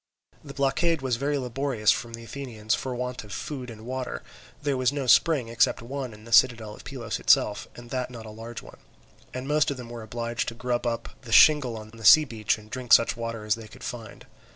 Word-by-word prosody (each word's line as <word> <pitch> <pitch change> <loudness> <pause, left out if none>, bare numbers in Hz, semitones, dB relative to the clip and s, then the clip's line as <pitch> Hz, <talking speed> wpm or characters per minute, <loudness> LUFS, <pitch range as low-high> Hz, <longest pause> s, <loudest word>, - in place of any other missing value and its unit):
The 140 - -10
blockade 140 +3 +1
was 125 -3 0
very 145 +3 0
laborious 125 -3 +1
for 120 - -2
the 115 0 -9
Athenians 115 -4 -4
from 130 -2 -2
want 125 -1 -4
of 105 - -13
food 130 +3 -5
and 110 -1 -11
water; 130 +1 -4 0.4
there 145 -1 -1
was 130 0 +2
no 145 -2 -3
spring 135 0 +4
except 115 0 +2
one 130 0 -5
in 105 0 -14
the 115 0 -7
citadel 115 -4 +4
of - - -13
Pylos - - -5
itself, - - +3
and 120 -1 -12
that 125 -1 -2
not 115 -3 -9
a 110 - -9
large 115 +2 -8
one, - - -14 0.5
and 130 +1 -6
most 150 +1 +2
of 140 - -3
them 120 -2 -9
were 120 -1 -7
obliged 115 +1 -3
to 115 - -4
grub 125 0 -2
up 115 -1 -3
the 120 -4 -10
shingle 130 -3 +6
on 110 0 -10
the 115 0 -13
sea 155 +7 +8
beach 115 -5 -1
and 105 0 -16
drink 125 -2 0
such 115 - +6
water 115 -2 -5
as 105 - +2
they 115 -1 -7
could 130 +4 -14
find. 115 -3 -8
120 Hz, 225 wpm, -26 LUFS, 115-130 Hz, 0.5 s, sea